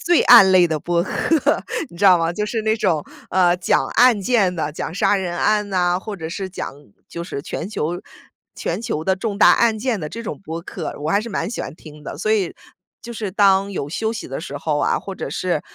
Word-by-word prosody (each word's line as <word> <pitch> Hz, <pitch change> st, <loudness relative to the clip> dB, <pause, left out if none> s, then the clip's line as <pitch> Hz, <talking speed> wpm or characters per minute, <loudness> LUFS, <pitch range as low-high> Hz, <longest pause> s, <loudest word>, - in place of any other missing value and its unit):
罪 -, -, +5 dB
案 195 Hz, -6 st, +8 dB
类 180 Hz, -1 st, +6 dB
的 160 Hz, -2 st, -2 dB
播 170 Hz, +2 st, 0 dB
客， 315 Hz, -, +1 dB, 0.3 s
你 170 Hz, -, -14 dB
知 205 Hz, -, +2 dB
道 185 Hz, -2 st, +7 dB
吗？ 165 Hz, 0 st, 0 dB
就 210 Hz, +4 st, -2 dB
是 225 Hz, +1 st, -2 dB
那 220 Hz, 0 st, +1 dB
种， 170 Hz, -8 st, +1 dB, 0.3 s
呃， 180 Hz, -1 st, +3 dB
讲 180 Hz, -, +1 dB
案 245 Hz, -3 st, +5 dB
件 195 Hz, -5 st, +2 dB
的， 155 Hz, -2 st, -2 dB
讲 150 Hz, -, -5 dB
杀 205 Hz, -, +3 dB
人 175 Hz, -2 st, -3 dB
案 210 Hz, 0 st, +1 dB
呐， 180 Hz, -2 st, +1 dB
或 210 Hz, +2 st, -6 dB
者 160 Hz, -4 st, -6 dB
是 190 Hz, +3 st, -5 dB
讲 185 Hz, -, -5 dB, 0.4 s
就 170 Hz, -, -6 dB
是 140 Hz, -, -5 dB
全 165 Hz, -, -5 dB
球 175 Hz, -3 st, -3 dB, 0.5 s
全 -, -, -3 dB
球 215 Hz, -10 st, -3 dB
的 190 Hz, +2 st, +1 dB
重 200 Hz, 0 st, -3 dB
大 -, -, +7 dB
案 230 Hz, -2 st, +3 dB
件 230 Hz, -1 st, -1 dB
的 155 Hz, -, -4 dB
这 230 Hz, +9 st, -7 dB
种 -, -, -6 dB
播 165 Hz, -3 st, -6 dB
客， 170 Hz, -1 st, -6 dB
我 155 Hz, +2 st, -1 dB
还 200 Hz, -, +3 dB
是 220 Hz, -, -6 dB
蛮 185 Hz, -3 st, -2 dB
喜 235 Hz, -, -6 dB
欢 -, -, -7 dB
听 150 Hz, -2 st, -14 dB
的。 -, -, -6 dB
所 215 Hz, +7 st, -1 dB
以 200 Hz, -5 st, +1 dB, 0.5 s
就 235 Hz, -, -8 dB
是 220 Hz, -3 st, -4 dB
当 195 Hz, 0 st, +3 dB
有 145 Hz, -5 st, -4 dB
休 220 Hz, +7 st, -2 dB
息 220 Hz, -, -7 dB
的 135 Hz, -, -4 dB
时 145 Hz, -2 st, -6 dB
候 150 Hz, +1 st, -1 dB
啊， -, -, +1 dB
或 195 Hz, -, -7 dB
者 -, -, -6 dB
是， 180 Hz, -5 st, -1 dB
190 Hz, 255 characters per minute, -20 LUFS, 170-215 Hz, 0.5 s, 案